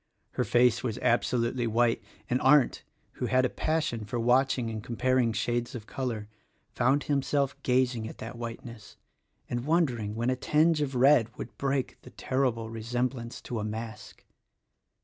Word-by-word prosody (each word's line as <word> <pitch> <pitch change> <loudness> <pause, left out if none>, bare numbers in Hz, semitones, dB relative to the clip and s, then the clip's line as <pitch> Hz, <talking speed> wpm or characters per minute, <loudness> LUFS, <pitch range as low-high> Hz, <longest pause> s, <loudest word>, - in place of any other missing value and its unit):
Her - - -1
face 120 -1 +3
was 120 -4 -3
absolutely 120 0 +1
white, 115 +1 +2 0.2
and 125 +1 0
Arndt 135 0 +4
— - - -41
who - - -1
had 130 0 +3
a - - +1
passion 155 -8 -1
for 105 +3 -3
watching 125 0 +2
and 110 -1 -5
comparing 125 0 +1
shades 120 +3 -2
of 110 -3 -7
color 115 -6 -4 0.2
— - - -42
found 135 +3 +2
himself 140 -1 0
gazing 125 -3 +1
at - - -11
that 115 +2 -7
whiteness 115 -1 -8 0.5
and 120 0 -3
wondering 125 -10 0
when 120 +3 0
a - - +1
tinge 155 +4 +2
of 140 -2 -2
red 125 -2 +5
would - - -7
break 135 -1 -1
the - - -13
terrible 125 -4 -1
resemblance 120 +1 -3
to 120 - -4
a - - -3
mask. 110 +1 -7
120 Hz, 165 wpm, -28 LUFS, 115-130 Hz, 0.5 s, red